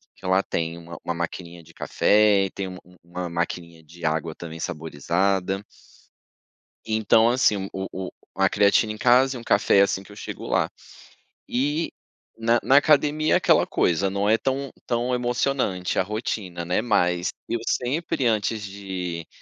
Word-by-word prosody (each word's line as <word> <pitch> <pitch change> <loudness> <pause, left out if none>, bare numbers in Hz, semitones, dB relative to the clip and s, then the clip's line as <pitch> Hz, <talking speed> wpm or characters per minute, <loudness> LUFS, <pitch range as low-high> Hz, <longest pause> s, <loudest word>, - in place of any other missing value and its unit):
que - - -15
lá 95 +1 +3
tem 85 0 -3
uma 85 -1 -10
uma 85 - -2
maquininha 85 0 -5
de - - -18
café, 105 -2 +3
tem 95 -1 -3
um 90 - -8
um 90 0 -19
uma 90 0 -5
maquininha 85 -1 -4
de 85 +2 -10
água 80 0 -1
também 80 -1 -8
saborizada. 90 +5 -1 1.2
Então, 110 +1 +3
assim, 105 -6 +2
o 95 0 -4
o 95 -1 -5 0.2
a - - +3
creatina 105 +2 +3
em 110 - -6
casa 130 +2 +4
e - - -7
um - - -11
café 100 -2 +4
assim 100 -1 +1
que 105 - -16
eu - - -12
chego - - -7
lá. - - +1 0.8
E, 145 +6 0 0.5
na 115 +1 +3
na 135 - +5
academia, 150 +1 +4
aquela - - +4
coisa, 90 +3 +1
não 100 +1 -1
é 110 - +4
tão 135 0 -2 0.2
tão 120 +1 0
emocionante 120 -6 -1
a - - +4
rotina, 100 -4 -4
né, 90 +4 0
mas 90 -6 +1 0.2
eu 120 - -1
sempre, 135 0 -1
antes 110 -1 0
de, 95 -4 -5
100 Hz, 160 wpm, -24 LUFS, 85-120 Hz, 1.2 s, na